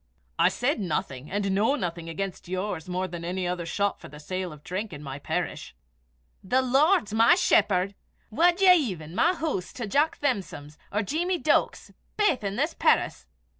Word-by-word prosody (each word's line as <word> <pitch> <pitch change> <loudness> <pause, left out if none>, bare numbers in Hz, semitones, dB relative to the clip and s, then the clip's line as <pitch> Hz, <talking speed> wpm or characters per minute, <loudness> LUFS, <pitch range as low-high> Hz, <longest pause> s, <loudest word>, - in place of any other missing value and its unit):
"I - - +6
said 250 +1 -1
nothing, 150 -7 -3
and 200 0 -1
know 215 +8 +2
nothing, 170 - -4
against 190 +3 -5
yours 185 -2 -4
more 185 +1 -1
than 170 -1 -7
any 180 +1 -2
other 175 -1 -3
shop 200 +4 -1
for - - -11
the 150 +1 -12
sale 185 +3 -4
of 150 -1 -13
drink 195 +3 -4
in 145 0 -8
my 135 0 -6
parish." - - -4 0.7
"The 255 +7 +2
Lord's 270 - +3
my 230 +9 +6
shepherd! 200 - +2 0.4
Wad 345 - +3
ye 370 -2 +8
even 190 - -1
(compare) 180 - +1
my 365 - +2
hoose 300 - -3
to 240 - -5
Jock 290 +10 +1
Thamson's 170 - -3
or 210 +2 0
Jeemie 345 - -1
Deuk's, 310 -2 0 0.3
baith 410 - +2
i' 200 - 0
this 285 - -1
perris?" - - +1
200 Hz, 180 wpm, -26 LUFS, 175-280 Hz, 0.7 s, ye